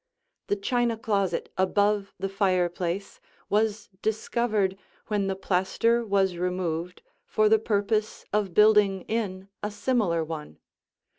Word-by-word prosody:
The - - +1
china 235 +3 0
closet 200 -4 -1
above 200 +1 +1
the 195 - -2
fireplace 185 -1 -1 0.3
was 210 0 +1
discovered 215 -2 0 0.3
when 205 -2 0
the 195 - -1
plaster 195 +5 +1
was 195 -4 +1
removed 180 -1 -2 0.2
for 215 0 +2
the 220 +1 +5
purpose 215 0 -1
of 205 -4 0
building 210 -3 +5
in 195 -4 -3
a 210 - -2
similar 205 -6 0
one. 155 - -7
200 Hz, 120 wpm, -27 LUFS, 185-215 Hz, 0.3 s, the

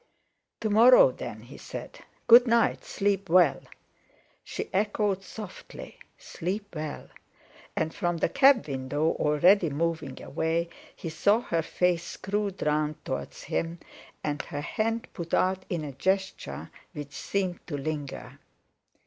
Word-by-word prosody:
"To 220 - 0
morrow 250 - +8
then," - - -7
he - - -12
said. - - -8 0.3
"Good 240 +2 +8
night. 230 0 +2
Sleep 200 -2 -1
well." 170 -6 +5 0.8
She - - -5
echoed 205 0 +1
softly: 215 - -10 0.2
"Sleep 200 +4 -5
well" 155 -1 -5 0.7
and 160 - -1
from 175 -3 -1
the - - +2
cab 275 - +5
window, 140 +3 -1
already 170 +4 +4
moving 165 +3 -2
away, 165 +1 -1 0.3
he 165 - -6
saw 205 +8 +3
her 170 -8 -1
face 175 +1 +1
screwed 200 +2 -3
round 150 0 -1
towards 130 - -5
him, 165 +1 -2 0.4
and 145 -1 -1
her 145 - -6
hand 225 +8 -2
put 170 -3 -2
out 185 0 +1
in 170 -3 -2
a 145 - -5
gesture 190 +8 -2 0.2
which 145 -3 -7
seemed 185 +5 -2
to 150 -5 -3
linger. 145 -1 -5
175 Hz, 130 wpm, -28 LUFS, 155-205 Hz, 0.8 s, morrow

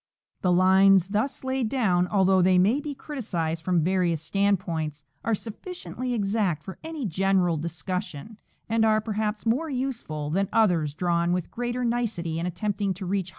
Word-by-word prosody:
f - - -49
The 180 - +2
lines 190 +1 +5
thus 215 +8 -1
laid 260 -3 -1
down, 185 -9 +2
although 190 -1 +3
they 185 +1 +4
may 205 +10 +4
be 290 -1 -5
criticised 170 - -3
from 175 -3 +2
various 175 -3 +1
standpoints, 170 -6 -1 0.2
are 230 - +1
sufficiently 250 - -5
exact 200 -7 0
for 190 - -9
any 320 -4 -5
general 185 -1 +2
discussion, 170 +4 -5 0.3
and 225 0 +2
are, 215 -1 +4
perhaps, 215 0 -3
more 265 +8 +1
useful 245 - -3
than 195 +3 0
others 175 -10 +2
drawn 170 0 +1
with 180 -2 -2
greater 245 +1 -2
nicety 215 -9 -1
and 170 - -2
attempting 200 +1 -2
to 190 +1 -6
reach - - -4
higher 200 0 +1
precision. - - -8
195 Hz, 170 wpm, -26 LUFS, 175-225 Hz, 0.3 s, lines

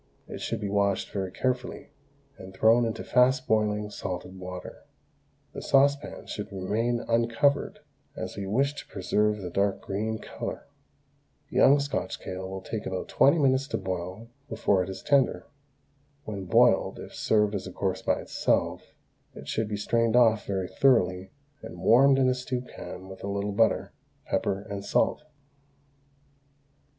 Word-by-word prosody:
It - - -8
should - - -2
be 105 - -3
washed 100 -1 0
very 95 -2 -2
carefully, 125 +4 -3 0.4
and 95 -7 -11
thrown 115 +4 +4
into 115 - -3
fast 130 +1 +3
boiling 105 -1 +1
salted 95 -1 -6
water. 90 0 -8 0.7
The - - -6
saucepan 140 +1 +2
should 105 +1 -6
remain 115 +6 -1
uncovered, 115 +5 +1 0.3
as - - -5
we 100 -1 -5
wish 135 +8 +1
to - - -9
preserve 105 +3 0
the 90 - -5
dark 100 +1 +1
green 110 +3 -3
colour. - - -6 0.9
Young 140 +2 +5
Scotch 140 0 -3
kale 95 0 -6
will 95 0 -6
take 110 +1 -5
about 95 -1 -4
twenty 140 +5 +4
minutes 135 -2 +2
to - - -2
boil 95 +4 -5 0.2
before 95 -7 +1
it 90 - -3
is 95 0 -7
tender. 140 -3 +2 0.8
When 100 -3 -5
boiled, - - +3
if - - -10
served 105 -1 +2
as 100 -1 -3
a - - -7
course 95 0 -2
by - - 0
itself, - - -1 0.4
it - - -10
should 110 -1 -1
be 105 -1 -3
strained 115 +2 +1
off 115 -3 +4
very 95 -2 -1
thoroughly 95 -9 +2 0.3
and 110 - -9
warmed 135 +4 +5
in 130 -1 +3
a 130 - +3
stew 125 0 -3
pan 95 -6 -9
with 95 0 -11
a - - -3
little 100 +1 -2
butter, 110 +3 +2 0.3
pepper, 95 0 -1
and 100 -1 -6
salt. 150 - +1
105 Hz, 155 wpm, -27 LUFS, 95-125 Hz, 0.9 s, Young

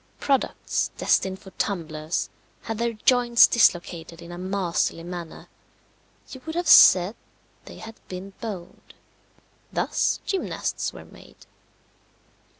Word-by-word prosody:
Products, 275 -2 -1
destined 190 0 +1
for 190 - -14
tumblers, 160 -4 -3 0.3
had 225 -1 -5
their 235 0 0
joints 240 +1 +5
dislocated 170 -6 +1
in 170 0 -11
a 175 - -8
masterly 185 -3 -1
manner 175 -2 -8 0.8
you 260 - -9
would 320 - -5
have 350 -1 -2
said 185 +4 +7 0.5
they - - -11
had 225 0 -10
been 190 +2 -8
boned. 200 -7 -8 0.8
Thus - - 0
gymnasts 385 -2 -3
were - - -12
made. - - -17
190 Hz, 115 wpm, -24 LUFS, 175-235 Hz, 0.8 s, said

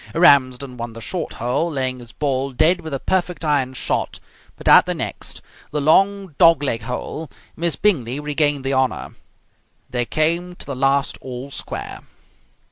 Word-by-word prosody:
Ramsden 135 -6 +4
won 120 -1 -5
the 115 - -9
short 175 +10 -4
hole, 125 +8 -1
laying 130 -4 -2
his 120 -2 -10
ball 135 -1 -1
dead 170 +8 +3
with 160 -1 -7
a 135 - -2
perfect 180 0 -1
iron 140 -4 +1
shot, - - -2 0.4
but - - -8
at - - +8
the - - -1
next, - - -4 0.3
the 150 - -2
long 195 +4 +3
dog 165 -4 +6
leg 115 -5 -1
hole, 125 +6 -5 0.3
Miss 170 -1 0
Bingley 140 - +1
regained 145 -1 0
the 135 - 0
honour. 130 -1 0 0.8
They 120 -1 0
came 170 +6 0
to - - -9
the 140 - -5
last 135 +1 +1
all 130 +2 -7
square. - - -6
140 Hz, 165 wpm, -21 LUFS, 130-165 Hz, 0.8 s, at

